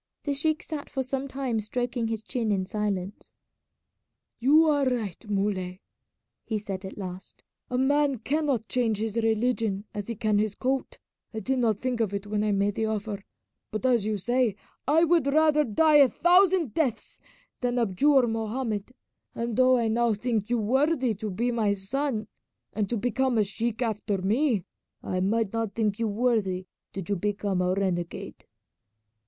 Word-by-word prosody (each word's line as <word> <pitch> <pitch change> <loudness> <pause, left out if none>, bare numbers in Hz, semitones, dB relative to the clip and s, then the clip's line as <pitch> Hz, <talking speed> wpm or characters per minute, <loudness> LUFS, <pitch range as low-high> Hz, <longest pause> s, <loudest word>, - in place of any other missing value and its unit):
The 285 - -1
sheik 310 +2 0
sat 300 -2 -6
for 265 - -2
some 270 +1 -3
time 265 -4 -2
stroking 240 +2 -2
his 225 -1 -3
chin 230 -4 -1
in 190 -2 0
silence. 205 -2 -3 1.1
"You 290 +7 +6
are 290 -2 +3
right, 215 -4 -4
Muley," 195 -3 -1 0.6
he 220 - -2
said 195 -2 -5
at 190 - -8
last; 185 -2 -8 0.3
"a 250 - -1
man 285 +1 +2
cannot 270 -2 -1
change 230 -4 +1
his 220 0 -3
religion 225 -2 0
as 205 -1 -5
he 230 - -3
can 215 -2 +1
his 210 -1 0
coat. 265 +1 -2 0.4
I - - -1
did 260 +5 -1
not 225 -4 +2
think 250 +1 -2
of 210 -3 0
it 200 0 -4
when 210 0 -1
I 210 - +1
made 200 +1 +1
the 220 +2 -1
offer; 210 -2 -3 0.5
but 215 +4 -4
as 235 -5 +3
you 215 -1 0
say, 240 +1 +1 0.3
I 315 +4 +4
would 335 -3 +3
rather 300 +1 +4
die 300 +6 +4
a 280 -3 +7
thousand 355 - +4
deaths 265 -6 -2 0.4
than 245 -1 -1
abjure 245 +5 +3
Mohammed; 225 0 -3 0.4
and 235 -1 -2
though 255 +1 +5
I 230 -2 +1
now 230 +1 +2
think 220 -1 -1
you 240 - +2
worthy 260 +3 +2
to 215 +1 -5
be 235 +6 -1
my 220 -4 +1
son, 215 +3 -2 0.5
and 210 -2 -1
to 240 - 0
become 245 +2 0
a 215 - +4
sheik 225 +4 -2
after 210 -3 -1
me, 215 - +1 0.4
I 185 - -2
might 210 +2 0
not 225 -3 -2
think 215 -2 0
you 230 - +1
worthy 205 -4 0 0.3
did 195 -3 -6
you 205 - 0
become 200 -1 -1
a 180 +1 +1
renegade." 175 -3 -3
225 Hz, 170 wpm, -27 LUFS, 205-255 Hz, 1.1 s, a